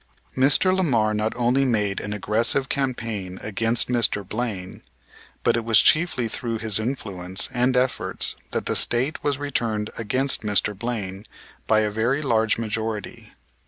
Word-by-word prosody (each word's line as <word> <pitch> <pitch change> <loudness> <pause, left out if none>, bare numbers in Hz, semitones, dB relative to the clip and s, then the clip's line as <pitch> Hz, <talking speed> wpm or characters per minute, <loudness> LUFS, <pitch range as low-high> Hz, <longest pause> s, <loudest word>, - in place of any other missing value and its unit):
Mr. 145 +8 +4
Lamar 120 -13 +1
not 105 +1 0
only 125 +3 +2
made 105 -6 0
an 105 - -6
aggressive 115 +6 +1
campaign 115 -9 -3
against 115 +3 +1
Mr. 115 -5 +1
Blaine, 105 -5 -5 0.6
but - - +3
it 115 - -2
was 115 -1 +5
chiefly 155 -7 +3
through 115 +1 -4
his 110 -2 +2
influence 95 -7 -1
and 125 +1 +1
efforts 125 0 +1
that - - -3
the - - -1
State 130 +6 +1
was 145 -2 0
returned 115 -7 -2
against 130 +5 +1
Mr. 105 -1 +1
Blaine 100 -3 -5 0.4
by 110 0 +3
a 105 -1 -1
very 120 +7 0
large 110 -5 +1
majority. 110 -1 -5
115 Hz, 145 wpm, -23 LUFS, 105-125 Hz, 0.6 s, was